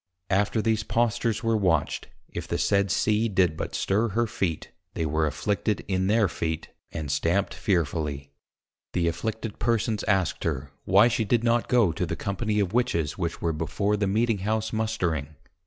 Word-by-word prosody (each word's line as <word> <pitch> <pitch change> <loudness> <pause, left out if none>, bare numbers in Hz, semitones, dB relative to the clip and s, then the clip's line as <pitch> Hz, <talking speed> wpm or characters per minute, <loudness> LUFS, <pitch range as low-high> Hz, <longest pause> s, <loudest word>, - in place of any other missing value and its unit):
After 105 +3 +2
these 110 -1 +2
Postures 115 0 0
were 115 0 +2
watched, 90 -8 +1 0.2
if - - -6
the - - -1
said 100 0 +2
C. 110 +4 +2
did 95 -5 +2
but - - -4
stir 105 +4 +1
her 115 +3 +1
Feet, 95 -8 -3 0.2
they 80 - -1
were 80 +1 +1
afflicted 105 +7 -1
in 95 -1 0
their 105 0 +4
Feet, 80 -2 -3 0.2
and 75 -3 -4
stamped 90 +7 +1
fearfully. 75 -6 -1 0.6
The 85 -1 +1
afflicted 105 +6 -3
Persons 110 -2 0
asked 95 -4 +1
her, 70 +1 -2
why 100 +5 +6
she 120 -1 +1
did 115 +2 +1
not 120 0 +2
go 120 -8 +4
to 80 - -2
the - - -2
Company 105 +2 -1
of 100 -1 0
Witches 85 -11 0
which 85 -2 -3
were 85 -1 +1
before 100 +7 0
the 105 -1 0
Meeting 110 +1 +1
House 110 +3 -1
Mustering? 85 -10 -1
100 Hz, 170 wpm, -26 LUFS, 85-110 Hz, 0.6 s, why